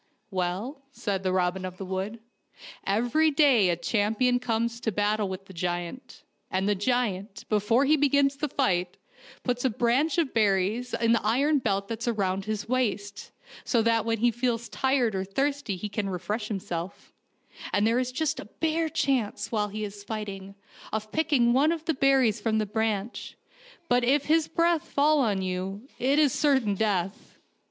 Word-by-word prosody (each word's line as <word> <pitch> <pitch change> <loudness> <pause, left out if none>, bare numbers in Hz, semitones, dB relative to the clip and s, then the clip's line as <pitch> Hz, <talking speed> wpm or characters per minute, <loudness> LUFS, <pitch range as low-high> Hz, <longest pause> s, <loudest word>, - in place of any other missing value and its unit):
" 215 - -25
^SA'ell," 190 - -2
said 200 -8 -3
Robin 185 0 0
of 185 -1 -6
the 195 - -6
Wood, 190 +4 -4 0.4
" - - -20 0.2
every 240 +10 +2
day 275 - +4
a 175 - +2
champion 220 +7 +1
comes 235 -1 -1
to 230 -2 -1
battle 210 0 0
with 190 +1 -6
the 190 - -13
giant, 175 +6 -4 0.3
and 190 +1 0
the 205 - +3
giant, 205 -2 -2
before 220 +5 +3
he 305 +3 +5
begins 280 -1 +3
the 300 +1 -2
fight, 180 -11 0 0.5
puts 245 -1 -1
a 260 - +3
branch 250 +8 +1
of 325 -6 +1
berries 215 +3 +1
in 230 -1 +2
the 230 - +2
iron 275 +7 +2
belt 200 -4 -1
that's 230 +2 -4
around 195 -4 0
his 215 -1 -3
waist, 210 -5 -2 0.3
so 235 -3 +2
that 230 -1 +2
when 225 0 0
he 240 +2 +3
feels 235 -1 -2
tired 260 -4 +1
or 190 -1 -1
thirsty 275 +2 -1
he 185 +4 -5
can 200 -1 -3
refresh 205 +4 -3
himself, 190 -3 -5 0.6
and 205 - +2
there 230 +2 +3
is 255 0 -1
just 305 +3 -1
a - - -7
bare 320 0 +1
chance, 260 -8 -1
while 210 -2 0
he 215 +1 -5
is 205 0 -7
fighting, 200 -2 -6 0.4
of 215 0 -4
picking 285 -7 +2
one 285 +5 +4
of 325 -1 -4
the 325 - +1
berries 260 -6 +3
from 220 0 +1
the 215 - +1
branch; 220 +1 -3 0.5
but 245 -4 +3
if 275 +4 +2
his 320 0 +3
breath 335 0 +1
fall 295 +2 +3
on 205 -7 +1
you 190 +5 -4
it 270 +3 +2
is 295 -4 +4
certain 265 -8 +2
death." 195 -2 -2
225 Hz, 180 wpm, -27 LUFS, 200-260 Hz, 0.6 s, he